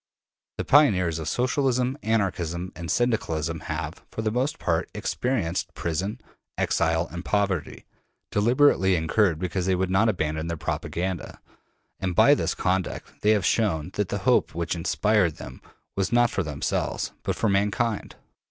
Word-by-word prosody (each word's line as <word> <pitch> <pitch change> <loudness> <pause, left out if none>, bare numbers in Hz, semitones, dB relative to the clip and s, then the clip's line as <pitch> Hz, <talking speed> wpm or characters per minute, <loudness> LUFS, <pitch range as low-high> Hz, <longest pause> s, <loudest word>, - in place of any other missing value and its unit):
The - - -3
pioneers 90 - +4
of 80 -1 -3
Socialism, 130 - +1
Anarchism, 90 -5 -1
and 85 -1 -6
Syndicalism 80 -7 0
have, 80 +1 -4
for 110 - -5
the 110 - 0
most 135 +7 -1
part, 80 -2 -1
experienced 95 -8 -2
prison, 95 +8 -2 0.4
exile, 80 0 +1
and 85 +1 -6
poverty, 100 -6 -1 0.5
deliberately 105 -3 +4
incurred 85 +2 +2
because 90 +1 -2
they 95 - +3
would 95 0 -1
not 110 +4 +4
abandon 80 -4 -1
their 85 0 -3
propaganda; 90 +3 -3 0.6
and 90 -2 -2
by - - +7
this - - 0
conduct 95 0 -2
they 105 - +2
have 105 -4 +3
shown 90 -10 +1
that - - -1
the - - -1
hope - - +3
which 85 0 -1
inspired 90 0 +1
them 65 +1 -10 0.3
was 95 +1 0
not 120 0 +4
for - - 0
themselves, 75 -5 -2
but - - -2
for 115 - 0
mankind. 105 +3 0
95 Hz, 150 wpm, -25 LUFS, 85-110 Hz, 0.6 s, by